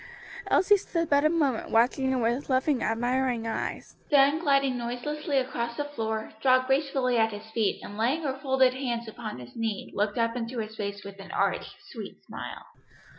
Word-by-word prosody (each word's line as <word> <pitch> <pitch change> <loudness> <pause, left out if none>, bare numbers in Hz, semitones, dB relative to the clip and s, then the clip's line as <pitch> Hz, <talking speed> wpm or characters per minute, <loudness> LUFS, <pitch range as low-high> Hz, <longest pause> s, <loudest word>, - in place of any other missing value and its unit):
Elsie 410 +2 +5
stood 335 -4 -2
but 285 0 +5
a 305 - +5
moment 290 -8 +1
watching 250 +3 +3
him 255 -2 +1
with 240 +5 0
loving, 260 0 +2
admiring 245 +1 0
eyes, 225 - -4
then 285 +1 +5
gliding 275 -4 +2
noiselessly 270 +5 -2
across 235 -3 -1
the 290 - -1
floor, 220 -3 -3
dropped 255 0 +4
gracefully 265 -2 +1
at 225 0 +3
his 215 +1 -9
feet 220 -3 0
and 205 +1 -8
laying 265 +9 +1
her 270 -2 -2
folded 265 -2 +3
hands 240 -3 -3
upon 220 - -6
his 125 -1 -11
knee 225 -3 -3
looked 205 +2 0
up 230 0 +1
into 240 +1 -4
his 220 -1 -4
face 200 -1 -4
with 200 0 -10
an 195 -1 -10
arch, - - 0 0.2
sweet - - -7
smile. - - -7
245 Hz, 180 wpm, -28 LUFS, 225-275 Hz, 0.2 s, Elsie